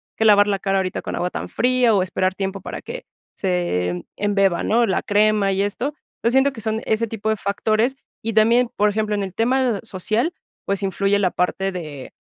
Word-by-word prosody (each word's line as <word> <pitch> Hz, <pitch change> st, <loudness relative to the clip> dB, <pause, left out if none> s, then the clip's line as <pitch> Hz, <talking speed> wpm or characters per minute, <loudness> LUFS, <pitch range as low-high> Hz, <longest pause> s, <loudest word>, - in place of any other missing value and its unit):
que 220 Hz, -, 0 dB
lavar 205 Hz, -1 st, +7 dB
la 200 Hz, -1 st, 0 dB
cara 195 Hz, -1 st, 0 dB
ahorita 185 Hz, -1 st, -2 dB
con -, -, -5 dB
agua 180 Hz, -, -1 dB
tan -, -, -5 dB
fría, 250 Hz, -2 st, +3 dB
o, 190 Hz, -, +3 dB
esperar 185 Hz, 0 st, -1 dB
tiempo 195 Hz, 0 st, -3 dB
para -, -, -6 dB
que -, -, -7 dB, 0.3 s
se 90 Hz, -, -1 dB
embeba", 195 Hz, -3 st, +1 dB
¿no? 235 Hz, +2 st, +3 dB
La 190 Hz, -4 st, 0 dB
crema 210 Hz, -1 st, +2 dB
y 195 Hz, +1 st, +1 dB
esto. 240 Hz, +8 st, -2 dB, 0.3 s
Yo 235 Hz, -, +4 dB
siento 265 Hz, +2 st, +4 dB
que 225 Hz, -, -8 dB
son 220 Hz, +1 st, -1 dB
ese 220 Hz, +1 st, +1 dB
tipo 220 Hz, -1 st, -3 dB
de 220 Hz, -, +2 dB
factores. 215 Hz, +6 st, 0 dB, 0.3 s
Y 225 Hz, +1 st, -3 dB
también, 230 Hz, +3 st, +4 dB
por 210 Hz, 0 st, +3 dB
ejemplo, 210 Hz, 0 st, -1 dB
en 205 Hz, -, -1 dB
el 190 Hz, -2 st, -6 dB
tema 245 Hz, 0 st, +1 dB
social, 225 Hz, -, -1 dB, 0.3 s
pues, 200 Hz, 0 st, -1 dB
influye 195 Hz, +1 st, +1 dB
la 190 Hz, -3 st, +1 dB
parte 190 Hz, +2 st, -1 dB
de: 150 Hz, -7 st, -7 dB
205 Hz, 205 wpm, -21 LUFS, 190-225 Hz, 0.3 s, lavar